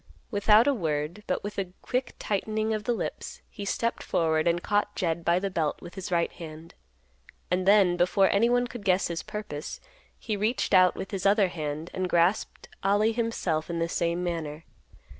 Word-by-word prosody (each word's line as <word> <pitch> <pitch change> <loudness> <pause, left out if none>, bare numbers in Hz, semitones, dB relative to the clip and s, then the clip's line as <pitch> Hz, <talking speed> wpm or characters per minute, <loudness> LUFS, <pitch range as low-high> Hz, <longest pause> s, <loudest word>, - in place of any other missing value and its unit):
Without 210 +2 +5
a 285 - +3
word, 160 - -2
but - - -1
with 205 0 -4
a 185 -2 -4
quick 250 0 -2
tightening 215 +2 -1
of 215 -1 -3
the 245 - +1
lips, - - -5
he 205 - -7
stepped 230 +4 -1
forward 160 -1 +1
and 170 0 +1
caught 205 0 0
Jed 170 -3 -1
by 170 +1 +3
the 195 +1 -2
belt 160 -4 -1
with 175 - -11
his 190 0 -6
right 170 -1 +1
hand; 160 0 -10 0.8
and 180 +1 +1
then, 195 -3 +5
before 185 +2 +3
anyone 240 +4 +3
could 240 -3 -8
guess 185 -2 +2
his 170 -1 -3
purpose, 180 -9 -6 0.4
he 215 - -3
reached 215 +3 0
out 185 -1 +6
with 190 - -6
his 195 -1 0
other 200 -1 +4
hand, 155 -1 -5
and 185 -1 -2
grasped 175 +4 +1
Ollie 205 +3 +3
himself 220 -9 -1
in 170 - -2
the 165 0 0
same 170 +1 -1
manner. 165 -3 -4
185 Hz, 185 wpm, -27 LUFS, 170-210 Hz, 0.8 s, out